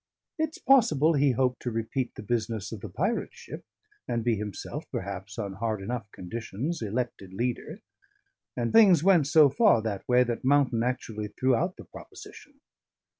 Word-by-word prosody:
It's 315 0 -1
possible 165 - +4
he 140 -2 +3
hoped 125 +1 0
to 125 - -2
repeat 115 +2 -3
the - - -8
business 110 -2 -2
of 110 -4 -7
the 110 - -7
pirate 200 - -2
ship, 470 0 -10 0.4
and 115 -1 -1
be 120 -1 +2
himself, 105 -2 -6
perhaps, 100 +1 -6
on 100 -4 -4
hard 110 +1 -2
enough 105 +1 -5
conditions, 115 - -5
elected 110 -4 -4
leader; 120 +3 -3 0.8
and 120 -1 -1
things 195 -9 +6
went 175 -7 +4
so 155 -1 +6
far 170 - +4
that 100 -2 -4
way 125 0 +5
that 120 -2 -4
Mountain 135 -3 +3
actually 115 -4 -3
threw 130 +5 0
out 175 +9 0
the - - -11
proposition. 280 -2 -13
120 Hz, 165 wpm, -27 LUFS, 110-150 Hz, 0.8 s, things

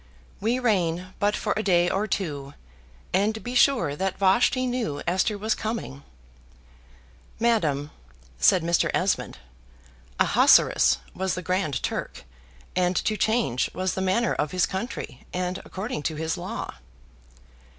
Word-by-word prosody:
We 230 +4 +1
reign 185 -6 0
but 205 +1 +2
for - - -1
a 215 - 0
day 175 -4 +3
or 200 +4 0
two: 145 -8 -3 0.6
and 215 +3 +1
be 245 - -5
sure 245 - +3
that 190 +4 -2
Vashti 235 +6 +3
knew 240 - -2
Esther 190 +5 +1
was 215 +2 0
coming." 215 - -4 1.4
"Madam," 155 -12 +1 0.5
said 180 - +4
Mr. 170 +1 +2
Esmond, 185 +1 0 0.8
"Ahasuerus - - +5 0.2
was 190 0 -1
the 185 - -5
Grand 180 -5 -1
Turk, - - -4 0.5
and 180 0 +1
to 215 - 0
change 220 - +1
was 185 +1 -1
the 190 - -3
manner 190 +6 +1
of 150 - -1
his 180 -1 +3
country, 190 - -6
and 180 0 -2
according 195 -1 -5
to 155 +1 -2
his 160 +1 -2
law." - - -5
190 Hz, 135 wpm, -25 LUFS, 170-220 Hz, 1.4 s, Ahasuerus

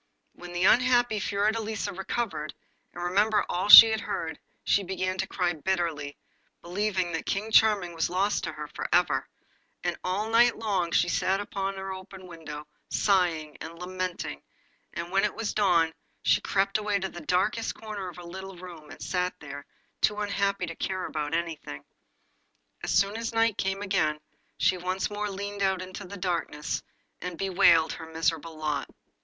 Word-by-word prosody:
When 175 0 -10
the 175 +1 -1
unhappy 245 0 +4
Fiordelisa 215 +2 -1
recovered, 190 -5 -3 0.4
and 175 - -7
remembered 205 +4 +2
all 185 +3 -2
she 225 +1 +13
had 220 - 0
just - - -8
heard, - - -3 0.2
she 200 - +3
began 185 0 -3
to 190 - 0
cry 180 -2 0
bitterly, 160 -4 -2 0.5
believing 185 0 -1
that 165 - -4
King 210 +3 -2
Charming 210 -6 +4
was 165 -1 0
lost 195 +3 0
to - - -3
her - - -6
for - - -5
ever, - - +2 0.6
and - - 0
all 190 +4 -1
night 240 +1 +5
long 195 -6 0
she 170 +3 +3
sat 190 +2 +1
at 205 - -6
her 195 -1 -3
open 190 0 -10
window 155 -4 -8 0.2
sighing 170 -6 +1
and 165 +1 -8
lamenting; 180 - -4 0.5
but 170 +1 -5
when 195 +1 +3
it - - 0
was 225 -2 -2
dawn 170 -6 +3 0.3
she - - +3
crept 195 +2 +1
away 210 -1 -1
into 190 -1 -1
the 175 - -9
darkest 200 +8 0
corner 210 -4 -6
of 175 - -11
her 175 - -10
little 190 +2 -8
room 170 -4 -11
and 155 - -10
sat 180 -1 -1
there, 145 -1 -9 0.3
too 210 - +3
unhappy 200 -2 0
to 165 -1 -7
care 185 +1 -3
about 150 0 -2
anything. 160 - -4 1.0
As - - -4
soon 200 +3 +2
as 230 0 -4
night 225 -2 +3
came 195 +1 -2
again 185 -6 +1 0.4
she 185 - +2
once 185 +3 -2
more 205 0 -2
leaned 200 +1 -5
out 190 -1 +2
into 185 +1 -7
the 200 +2 -8
darkness 170 -5 -2 0.4
and 180 -1 -5
bewailed 170 -4 +4
her 160 - -8
miserable 165 0 -1
lot. 150 -2 -2
185 Hz, 170 wpm, -27 LUFS, 170-205 Hz, 1.0 s, she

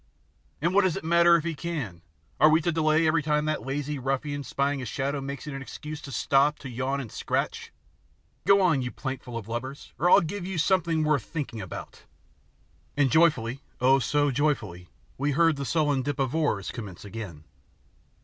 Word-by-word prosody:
"And 170 +2 +2
what 200 - +6
does 185 -4 +1
it - - -6
matter 170 +1 +5
if 165 - +1
he 170 -1 -2
can? 140 - -5 0.4
Are 155 - +7
we 155 +1 +5
to 170 - 0
delay 155 0 +2
every 155 +1 +3
time 150 0 +1
that 155 0 -1
lazy 145 +2 -3
ruffian 135 +2 -2
spying 140 0 -1
a - - -5
shadow 140 +4 -2
makes 140 0 -6
it 150 - -6
an 135 - -5
excuse 150 +2 -7
to 140 - -9
stop 135 +5 +2
to 130 - -8
yawn 130 +3 -2
and 125 -6 -6
scratch? - - -2 0.8
Go 200 0 +6
on, 160 -7 +3
you 125 - -2
plankful 130 -3 -5
of 110 -3 -7
lubbers, 130 +5 -6
or 175 - +3
I'll - - +7
give 185 +4 -4
you 190 0 -4
something 165 -1 +2
worth 150 -6 +1
thinking 140 -9 -5
about!" 95 - -9 0.9
And 140 -3 +3
joyfully, 140 -6 +3 0.2
oh, 130 +2 +5
so 145 +2 +1
joyfully, 115 - -1 0.3
we 145 +1 +1
heard 165 +2 +4
the 140 0 -4
sullen 145 -3 +1
dip 145 +1 -3
of 135 -1 -1
oars 145 - 0
commence 105 -6 -8
again. 100 -7 -8
145 Hz, 190 wpm, -27 LUFS, 130-155 Hz, 0.9 s, Are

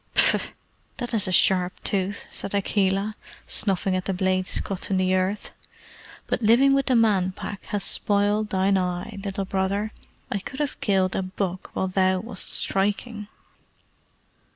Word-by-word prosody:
"Phff! - - +4 0.4
That 245 -1 -4
is 205 -3 +4
a - - -1
sharp 180 0 +3
tooth," 200 0 -1
said 200 - -3
Akela, 200 +1 0 0.3
snuffing 195 -2 +2
at 185 0 -2
the 195 - -1
blade's 185 0 0
cut 195 -2 -5
in 195 - +1
the 185 0 +2
earth, 185 +2 -1 0.7
"but - - -2
living 240 +5 +5
with 275 0 +1
the 255 - +3
Man 200 -5 +3
Pack 200 +1 -7
has 205 -1 -2
spoiled 205 +1 +1
thine 190 0 +2
eye, 180 +3 -3
Little 195 -1 -3
Brother. 195 +3 -1 0.4
I 200 - 0
could 260 +8 -8
have 295 -2 -3
killed 190 -2 +1
a - - 0
buck 185 -1 -4
while 190 - 0
thou 185 0 +2
wast 215 -4 -4
striking." 205 +2 -1
195 Hz, 155 wpm, -24 LUFS, 185-210 Hz, 0.7 s, living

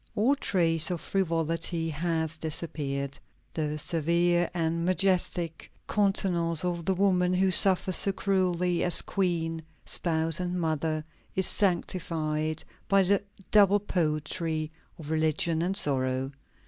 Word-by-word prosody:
All 245 +7 +3
trace 165 - +2
of 175 -2 -2
frivolity 165 -2 -1
has 160 0 -1
disappeared. 140 -3 -3 0.3
The 150 -1 -2
severe 170 +2 +1
and 165 -1 -1
majestic 180 -3 0 0.2
countenance 180 -5 +1
of 170 -2 -3
the 190 - +1
woman 180 -1 +2
who 190 +1 +2
suffers 185 -1 +4
so 200 - +5
cruelly 180 -3 0
as 175 - +2
queen, 165 -4 -1 0.2
spouse, 165 -1 0
and 180 0 -2
mother, 155 -1 -1 0.3
is 190 - +2
sanctified 160 -5 0 0.2
by 195 -1 +4
the 195 +1 +2 0.3
double 205 -1 +5
poetry 155 -3 -2 0.3
of 155 -1 -8
religion 160 +1 +1
and 185 +3 -1
sorrow. 130 -2 0
170 Hz, 120 wpm, -28 LUFS, 160-185 Hz, 0.3 s, so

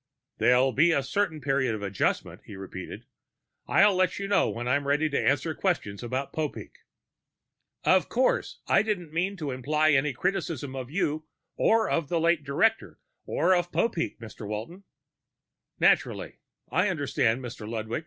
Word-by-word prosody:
"There'll 125 +2 +4
be 170 +5 +4
a 140 -4 +1
certain 160 +1 -1
period 130 -3 +1
of 105 - -7
adjustment," 100 -1 -1
he 100 - -10
repeated. 95 -1 -8 0.6
"I'll 200 0 +5
let 185 -1 +1
you 200 - -3
know 200 - +3
when 120 +1 -4
I'm 140 +2 +1
ready 150 +2 +2
to 140 - 0
answer 160 +3 +1
questions 145 - -2
about 130 +3 -3
Popeek." 155 -2 -4 1.1
"Of - - +3
course. - - 0
I - - +4
didn't 180 -8 -3
mean 185 +4 -1
to 150 -5 -4
imply 150 +5 +1
any 145 +1 +3
criticism 160 -3 -2
of 130 -2 -5
you 155 -2 -1 0.3
or 225 0 +3
of 165 -4 -1
the 170 - +1
late 165 -1 +2
director 215 +11 +1 0.3
or 185 - +2
of 175 -1 0
Popeek, 220 -8 -1
Mr. 110 -2 -9
Walton." 115 - -6 0.9
"Naturally. - - +1 0.3
I 180 +9 +2
understand, 135 -7 0
Mr. 115 -3 -7
Ludwig." 110 0 -3
150 Hz, 155 wpm, -27 LUFS, 125-180 Hz, 1.1 s, I'll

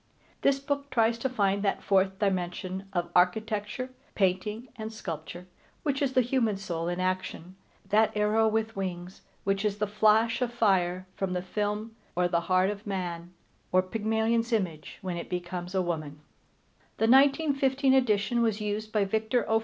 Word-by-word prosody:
This 275 -1 +3
book 280 0 -3
tries 230 -2 +2
to 265 - -1
find 200 -5 +1
that 200 -1 0
fourth 190 -1 +2
dimension 190 -1 -2
of 175 -2 -2
architecture, 210 +6 +1 0.2
painting, 210 +5 0
and 220 0 -6
sculpture, 175 -4 -7 0.4
which 285 -2 0
is 270 -2 +1
the 255 - +5
human 230 -5 +1
soul 170 -4 -3
in 175 +1 -2
action, 185 -1 -3 0.3
that 215 +1 +4
arrow 215 +1 +3
with 220 0 0
wings 185 -1 -5 0.2
which 195 0 0
is 205 -1 0
the 210 - 0
flash 220 +3 +3
of 245 -1 0
fire 185 -6 +1
from 190 -1 -2
the 180 0 -2
film, 210 +3 -3 0.2
or 180 0 +2
the 170 -1 +1
heart 185 +2 +4
of 205 +1 -8
man, 175 -3 -4 0.4
or 185 0 +4
Pygmalion's 225 +3 0
image, 180 -9 -2
when 180 -2 -3
it 170 - -6
becomes 180 +1 -4
a 185 - +2
woman. 155 -4 -4 0.8
The 225 - +2
1915 275 +1 +4
edition 235 -2 +2
was 225 -2 +1
used 210 +1 -3
by 210 -2 +2
Victor 220 +3 0
O. 220 0 +3
205 Hz, 165 wpm, -28 LUFS, 185-225 Hz, 0.8 s, the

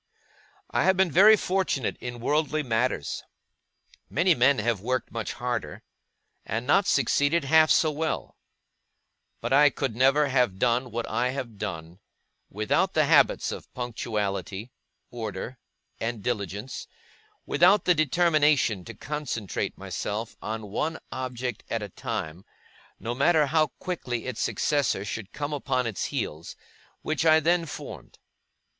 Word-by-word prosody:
I - - +2
have 190 -1 +4
been 190 -3 +3
very 210 +7 +7
fortunate 185 - -1
in 120 -1 -6
worldly 150 +3 +1
matters; 115 - -1 0.9
many 175 +4 +3
men 130 0 +4
have 110 -2 0
worked 125 +3 -2
much 115 -2 -4
harder, 120 -11 -4 0.6
and 115 +2 -3
not 195 +8 +3
succeeded 145 +4 +2
half 155 +2 +5
so 155 - +4
well; 155 +2 -3 1.1
but 120 +3 -1
I 145 +1 +6 0.2
never 135 +6 +4
could 145 - -1
have 125 -8 +2
done 125 +3 +1
what 115 0 -3
I 125 +1 0
have 125 -6 -5
done, 85 -3 -6 0.5
without 105 +1 0
the - - +4
habits - - +4
of - - -8
punctuality, 110 -3 -3 0.4
order, 115 +1 -6 0.4
and 115 -2 -3
diligence, 105 +1 -4 0.6
without 180 +5 +4
the 180 - +5
determination 150 - +2
to - - -9
concentrate 145 -9 -4
myself 105 +2 -4
on 110 -1 -5
one 160 +9 -1
object 125 -2 -4
at 115 -2 -2
a 105 - -6
time, 80 0 -5 0.6
no 115 - -3
matter 150 +4 +3
how 155 +2 +2
quickly 125 -10 -4
its 130 -3 -4
successor 140 -9 0
should 105 -1 -5
come 145 0 -4
upon 130 -3 -1
its 110 -5 -2
heels, 80 +2 -4 0.5
which 155 +1 -1
I 160 -1 +6
then 170 +2 +1
formed. - - -9
125 Hz, 135 wpm, -26 LUFS, 110-150 Hz, 1.1 s, very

